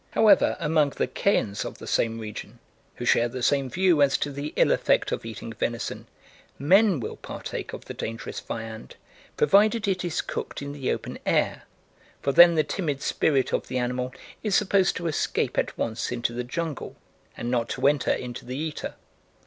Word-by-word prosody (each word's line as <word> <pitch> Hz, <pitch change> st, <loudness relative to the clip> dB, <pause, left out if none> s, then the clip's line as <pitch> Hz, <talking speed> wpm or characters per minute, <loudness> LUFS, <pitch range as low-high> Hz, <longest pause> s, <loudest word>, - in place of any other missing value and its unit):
However, 215 Hz, -2 st, +4 dB
among 155 Hz, -3 st, +2 dB
the -, -, +1 dB
Kayans 105 Hz, -, 0 dB
of -, -, -7 dB
the -, -, -10 dB
same 115 Hz, -1 st, 0 dB
region, 110 Hz, +1 st, -7 dB, 0.4 s
who 120 Hz, -, -5 dB
share 120 Hz, 0 st, +3 dB
the 125 Hz, 0 st, -5 dB
same 135 Hz, 0 st, +2 dB
view 180 Hz, -1 st, +3 dB
as 140 Hz, -1 st, +4 dB
to 145 Hz, -, -2 dB
the 140 Hz, +2 st, -5 dB
ill -, -, +4 dB
effect -, -, +2 dB
of -, -, -3 dB
eating 115 Hz, +1 st, -7 dB
venison, 115 Hz, +1 st, -3 dB, 0.5 s
men 190 Hz, -, +4 dB
will 115 Hz, -, -5 dB
partake -, -, -6 dB
of -, -, -8 dB
the -, -, -6 dB
dangerous 115 Hz, +1 st, -5 dB
viand 110 Hz, -1 st, -7 dB, 0.4 s
provided 215 Hz, +2 st, +4 dB
it 185 Hz, -2 st, 0 dB
is 175 Hz, -3 st, -1 dB
cooked -, -, -5 dB
in 140 Hz, -, -5 dB
the 140 Hz, -3 st, -2 dB
open -, -, -4 dB
air, -, -, +1 dB, 0.5 s
for 140 Hz, -, 0 dB
then 170 Hz, +4 st, +8 dB
the 155 Hz, -, +3 dB
timid 150 Hz, -7 st, -3 dB
spirit 135 Hz, -4 st, +1 dB
of -, -, -1 dB
the 130 Hz, -, -3 dB
animal 125 Hz, +1 st, -1 dB, 0.3 s
is 210 Hz, -3 st, 0 dB
supposed 195 Hz, -2 st, +3 dB
to 175 Hz, -, -5 dB
escape 160 Hz, -3 st, 0 dB
at -, -, -1 dB
once 115 Hz, +1 st, -2 dB
into 120 Hz, -1 st, -1 dB
the 125 Hz, +1 st, -3 dB
jungle 155 Hz, +3 st, -4 dB, 0.4 s
and 120 Hz, -, -3 dB
not 120 Hz, -2 st, 0 dB
to -, -, -2 dB
enter 145 Hz, -1 st, +2 dB
into 125 Hz, -1 st, -4 dB
the 125 Hz, +1 st, -5 dB
eater. 155 Hz, 0 st, -4 dB
140 Hz, 185 wpm, -26 LUFS, 120-170 Hz, 0.5 s, then